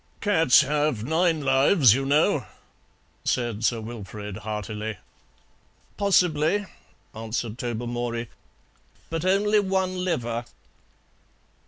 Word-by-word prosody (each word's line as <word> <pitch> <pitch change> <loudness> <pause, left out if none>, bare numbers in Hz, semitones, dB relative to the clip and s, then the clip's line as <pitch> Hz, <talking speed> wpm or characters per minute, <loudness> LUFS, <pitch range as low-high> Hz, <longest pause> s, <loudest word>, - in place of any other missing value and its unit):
"Cats 165 - +5
have 145 -6 0
nine 160 +3 +1
lives, 135 - +5
you 135 +2 -1
know," 145 - +2 0.8
said 120 -3 -1
Sir 115 0 +1
Wilfrid 105 -3 -7
heartily. 105 0 -5 1.0
"Possibly," 180 -1 +2 0.5
answered 115 +1 -4
Tobermory; 120 0 -3 0.8
"but 165 0 -2
only 205 +3 +3
one 190 -2 -1
liver." 120 -9 -2
135 Hz, 85 wpm, -25 LUFS, 115-170 Hz, 1.0 s, Cats